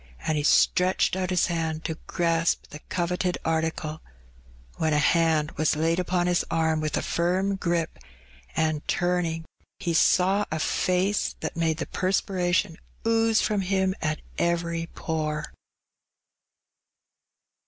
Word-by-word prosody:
'* -, -, -24 dB
And 155 Hz, -, +1 dB
he 150 Hz, -, 0 dB
stretched 180 Hz, +5 st, +3 dB
out 185 Hz, -1 st, -2 dB
his 180 Hz, -1 st, +3 dB
hand 165 Hz, -2 st, -2 dB
to 160 Hz, -1 st, -3 dB
grasp 165 Hz, -2 st, 0 dB
the 150 Hz, -, -8 dB
coveted 180 Hz, +1 st, -1 dB
article, 160 Hz, -1 st, -1 dB, 0.8 s
when 160 Hz, -1 st, +1 dB
a -, -, +3 dB
hand 160 Hz, 0 st, +3 dB
was 155 Hz, +1 st, +2 dB
laid 165 Hz, +3 st, +1 dB
upon 180 Hz, -1 st, 0 dB
his 175 Hz, -1 st, +2 dB
arm 160 Hz, -1 st, +1 dB
with 155 Hz, -1 st, -1 dB
a -, -, -1 dB
firm 185 Hz, +3 st, 0 dB
grip, 170 Hz, -3 st, -1 dB, 0.6 s
and, 155 Hz, -2 st, +1 dB
turning, 175 Hz, -2 st, 0 dB, 0.3 s
he 175 Hz, -4 st, -2 dB
saw 190 Hz, +5 st, +3 dB
a 160 Hz, -, -1 dB
face 185 Hz, +5 st, 0 dB
that -, -, -4 dB
made 165 Hz, -1 st, 0 dB
the 165 Hz, -, -3 dB
perspiration 185 Hz, -2 st, 0 dB, 0.3 s
ooze 225 Hz, -1 st, +3 dB
&om 205 Hz, -2 st, +1 dB
him 190 Hz, 0 st, +1 dB
at 155 Hz, -1 st, -1 dB, 0.2 s
every 170 Hz, -1 st, 0 dB
pore. 155 Hz, -2 st, -3 dB
170 Hz, 135 wpm, -26 LUFS, 160-185 Hz, 0.8 s, stretched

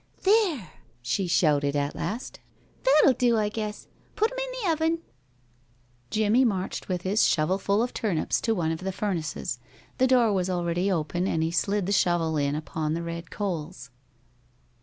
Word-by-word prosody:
"There!" 375 Hz, -, +2 dB, 0.3 s
she 180 Hz, +10 st, -1 dB
shouted 145 Hz, -4 st, +2 dB
at 145 Hz, 0 st, -1 dB
last. 230 Hz, +5 st, -5 dB, 0.4 s
"That'll 275 Hz, 0 st, +5 dB
do, 240 Hz, -2 st, +2 dB
I 210 Hz, -1 st, +1 dB
guess. 210 Hz, -1 st, -5 dB, 0.3 s
Put 435 Hz, +3 st, +1 dB
'em -, -, -5 dB
in -, -, -3 dB
the 360 Hz, -, +2 dB
oven." 320 Hz, +1 st, 0 dB, 1.1 s
Jimmie 220 Hz, -, +3 dB
marched 195 Hz, -6 st, -2 dB
with 180 Hz, -1 st, -2 dB
his 200 Hz, +3 st, +3 dB
shovelful 190 Hz, +6 st, +1 dB
of 245 Hz, -, -3 dB
turnips 190 Hz, -8 st, -1 dB
to 225 Hz, -1 st, +1 dB
one 165 Hz, -4 st, 0 dB
of 160 Hz, -, -3 dB
the 190 Hz, +1 st, -3 dB
furnaces. 185 Hz, -5 st, -3 dB, 0.4 s
The 260 Hz, -, +5 dB
door 245 Hz, -4 st, +4 dB
was 185 Hz, -1 st, 0 dB
already 175 Hz, +1 st, 0 dB
open, 175 Hz, +2 st, -1 dB
and 160 Hz, -3 st, 0 dB
he 165 Hz, -, 0 dB
slid 200 Hz, +3 st, 0 dB
the 200 Hz, -, -2 dB
shovel 175 Hz, -4 st, +2 dB
in 145 Hz, 0 st, 0 dB
upon 155 Hz, +1 st, -2 dB
the 170 Hz, -, -3 dB
red 170 Hz, 0 st, -6 dB
coals. 165 Hz, -9 st, -4 dB
190 Hz, 165 wpm, -26 LUFS, 165-225 Hz, 1.1 s, That'll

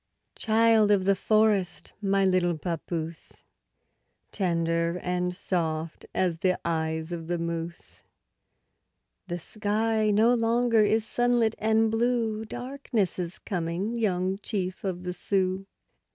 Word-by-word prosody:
Child 220 Hz, -1 st, +4 dB
of 200 Hz, -2 st, +3 dB
the 195 Hz, -, +5 dB
forest, 210 Hz, -2 st, +1 dB
my 195 Hz, -1 st, +2 dB
little 180 Hz, -3 st, +2 dB
papoose, 165 Hz, 0 st, -5 dB, 0.9 s
Tender 170 Hz, -2 st, 0 dB
and 180 Hz, 0 st, -1 dB
soft 165 Hz, -4 st, -3 dB
as 175 Hz, -3 st, +1 dB
the 185 Hz, 0 st, +1 dB
eyes 160 Hz, 0 st, -1 dB
of 165 Hz, -2 st, -5 dB
the 175 Hz, 0 st, -1 dB
moose, 170 Hz, 0 st, -5 dB, 1.3 s
The 175 Hz, -1 st, -3 dB
sky 215 Hz, +4 st, 0 dB
no 220 Hz, +4 st, +4 dB
longer 230 Hz, -1 st, +3 dB
is 220 Hz, +1 st, +2 dB
sunlit 240 Hz, -2 st, +2 dB
and 220 Hz, +1 st, +3 dB
blue— 225 Hz, -1 st, 0 dB
Darkness 245 Hz, -5 st, -3 dB
is 175 Hz, 0 st, -4 dB
coming, 180 Hz, +4 st, -3 dB
young 190 Hz, -4 st, 0 dB
chief 190 Hz, -4 st, -3 dB
of 180 Hz, -2 st, -3 dB
the 180 Hz, 0 st, -3 dB
Sioux! 190 Hz, +1 st, -1 dB
190 Hz, 120 wpm, -27 LUFS, 175-220 Hz, 1.3 s, the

